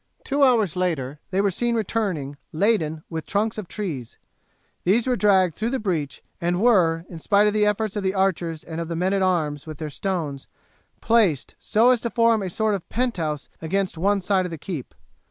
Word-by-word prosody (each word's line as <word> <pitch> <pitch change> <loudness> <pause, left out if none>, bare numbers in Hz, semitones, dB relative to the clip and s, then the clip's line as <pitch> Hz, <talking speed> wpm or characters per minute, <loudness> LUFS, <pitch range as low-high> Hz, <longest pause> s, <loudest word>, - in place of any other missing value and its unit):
Two 285 0 -1
hours 225 - +3
later 150 -6 -2
they 190 +1 +1
were 200 -1 +2
seen 235 +5 0
returning 190 -10 -1 0.2
laden 160 -4 +1
with 160 -2 -5
trunks 215 +2 0
of 200 - -7
trees. 165 - -5 0.7
These 215 +6 +3
were 255 -1 +2
dragged 190 -5 +3
through 220 +7 -2
the 265 - -1
breach, 165 - -3 0.2
and 175 +1 0
were, 175 -8 +3
in 165 - -9
spite 205 +5 +3
of 210 - +2
the 210 -1 +3
efforts 210 0 0
of 205 - -1
the 190 0 -1
archers 175 -4 0
and 165 0 -5
of 165 - -4
the 165 - -3
men 185 +3 0
at 195 - +1
arms 160 -6 0
with 155 -2 -7
their 155 -1 -5
stones, 155 -5 -3 0.5
placed 210 - +2
so 230 +4 +4
as 245 -3 +2
to 235 - -2
form 230 -2 +3
a 190 - -3
sort 215 +4 +1
of 195 -4 -4
penthouse 175 - -1
against 190 +4 -1
one 200 +4 +1
side 185 0 +1
of - - -3
the 165 - -6
keep. 155 -4 -6
190 Hz, 205 wpm, -23 LUFS, 165-215 Hz, 0.7 s, so